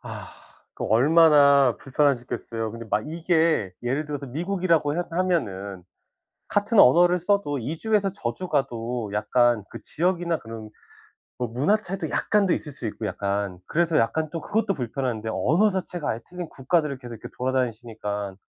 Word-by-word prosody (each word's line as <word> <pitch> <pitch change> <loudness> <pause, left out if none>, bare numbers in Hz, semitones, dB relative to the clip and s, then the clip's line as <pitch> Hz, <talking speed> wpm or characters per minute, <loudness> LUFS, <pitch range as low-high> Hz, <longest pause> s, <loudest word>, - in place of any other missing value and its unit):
아 - - -8 0.4
그 - - -5
얼마나 140 +1 +5
불편하셨겠어요. 125 -5 -1
근데 115 0 -8
막 105 - +1
이게 160 - +1
예를 135 +5 -1
들어서 145 -2 -5
미국이라고 165 0 0
해 175 - +1
하면은 100 - -1 0.7
같은 205 +1 +2
언어를 175 +7 +6
써도 175 -6 0
이 145 +8 -4
주에서 210 -2 +1
저 120 -12 -4
주 185 - -6
가도 120 - -2
약간 120 +1 +2
그 - - -8
지역이나 170 -1 0
그런 110 -1 -9 0.7
뭐 125 -2 -2
문화 140 - +2
차이도 195 -2 -5
약간 210 -2 +2
더 175 - +2
있을 150 - -3
수 125 -4 -6
있고 110 +1 -4
약간. 100 -1 -2
그래서 165 -1 +1
약간 155 +7 0
또 165 - -4
그것도 210 -2 0
불편한데 120 -3 -3
언어 185 +10 +3
자체가 180 -4 -3
아예 115 - -3
틀린 180 -2 -6
국가들을 145 +1 0
계속 120 -2 -9
이렇게 - - -8
돌아다니시니까. 110 -6 -3
140 Hz, 355 characters per minute, -25 LUFS, 115-175 Hz, 0.7 s, 언어를